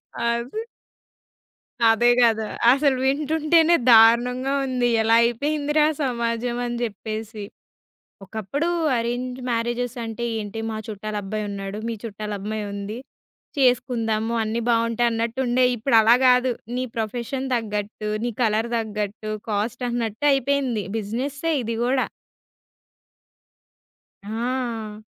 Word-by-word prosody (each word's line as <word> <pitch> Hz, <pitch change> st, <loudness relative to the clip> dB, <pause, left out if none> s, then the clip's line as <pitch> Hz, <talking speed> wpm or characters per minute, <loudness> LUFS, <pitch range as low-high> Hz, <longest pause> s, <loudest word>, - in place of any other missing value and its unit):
అది. 235 Hz, -, -2 dB, 1.2 s
అదే 230 Hz, +2 st, +4 dB
గదా! 220 Hz, -2 st, +3 dB, 0.2 s
అసలు 275 Hz, 0 st, +3 dB
వింటుంటేనే 310 Hz, +4 st, +3 dB, 0.2 s
దారుణంగా 240 Hz, +4 st, +5 dB
ఉంది. 250 Hz, -2 st, 0 dB
ఎలా 225 Hz, +1 st, +4 dB
అయిపోయిందిరా 295 Hz, +5 st, +1 dB, 0.2 s
సమాజం 240 Hz, -2 st, -1 dB
అని 240 Hz, 0 st, -3 dB
జెప్పేసి. 220 Hz, -1 st, -5 dB, 0.8 s
ఒకప్పుడూ 220 Hz, -, -3 dB, 0.3 s
అరేంజ్ 245 Hz, +2 st, -2 dB
మ్యారేజెసంటే 235 Hz, 0 st, -2 dB, 0.2 s
ఏంటి, 210 Hz, +1 st, -5 dB
మా 220 Hz, -, -4 dB
చుట్టాలబ్బాయున్నాడు, 205 Hz, -1 st, -4 dB
మీ 230 Hz, -, -2 dB
చుట్టాలమ్మాయుంది, 210 Hz, -1 st, -5 dB, 0.6 s
చేసుకుందాము 235 Hz, -3 st, +1 dB
అన్నీ 220 Hz, +2 st, -2 dB
బావుంటే 230 Hz, 0 st, +1 dB
అన్నట్టుండేయి. 245 Hz, +2 st, +1 dB
ఇప్పుడు 235 Hz, +1 st, +2 dB
అలా 225 Hz, +2 st, +6 dB
గాదు. 250 Hz, 0 st, +4 dB, 0.2 s
నీ 255 Hz, -, -1 dB
ప్రొఫెషన్ 240 Hz, +4 st, -3 dB
దగ్గట్టు, 210 Hz, -1 st, -4 dB, 0.2 s
నీ 240 Hz, -, 0 dB
కలర్ 220 Hz, 0 st, +1 dB
దగ్గట్టు, 215 Hz, -1 st, -4 dB, 0.2 s
కాస్టన్నట్టు 235 Hz, +3 st, -2 dB
అయిపేయింది. 270 Hz, -4 st, 0 dB, 0.2 s
బిజినెస్సే 265 Hz, +9 st, -3 dB
ఇది 230 Hz, 0 st, -3 dB
గూడా. 255 Hz, +1 st, +1 dB, 2.2 s
ఆ! 225 Hz, -1 st, -3 dB
235 Hz, 95 wpm, -23 LUFS, 215-255 Hz, 2.2 s, అలా